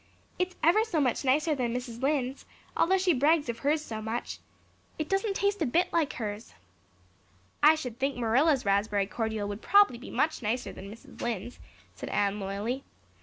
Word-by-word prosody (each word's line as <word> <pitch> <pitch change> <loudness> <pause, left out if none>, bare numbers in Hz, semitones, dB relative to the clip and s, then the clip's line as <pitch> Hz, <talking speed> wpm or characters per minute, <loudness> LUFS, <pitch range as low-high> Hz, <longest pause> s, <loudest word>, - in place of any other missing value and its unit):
"It's 365 0 -1
ever 355 +7 +5
so 385 -8 -1
much 260 -2 +1
nicer 295 +4 +2
than 245 -4 -1
Mrs. 245 -1 -5
Lynde's, 270 -2 -1 0.3
although 380 +3 +3
she 370 -2 +2
brags 295 +1 +2
of 235 0 -3
hers 300 +4 0
so 220 -1 -5
much. 225 +2 -4 0.6
It 310 - -3
doesn't 390 +1 0
taste 400 -1 0
a - - +3
bit 340 +9 +1
like 320 -3 +1
hers." 210 -1 -6 1.1
"I 305 +2 +7
should 250 -6 -6
think 275 0 -1
Marilla's 255 +4 +2
raspberry 200 0 +1
cordial 220 0 -3
would 205 +2 -6
prob'ly 400 -12 +4
be 260 - -10
much 315 -1 0
nicer 240 +3 -2
than 195 +1 -9
Mrs. 230 - -13
Lynde's," 235 0 -4 0.3
said - - -7
Anne 205 0 0
loyally. 205 +7 -3
255 Hz, 175 wpm, -29 LUFS, 220-315 Hz, 1.1 s, I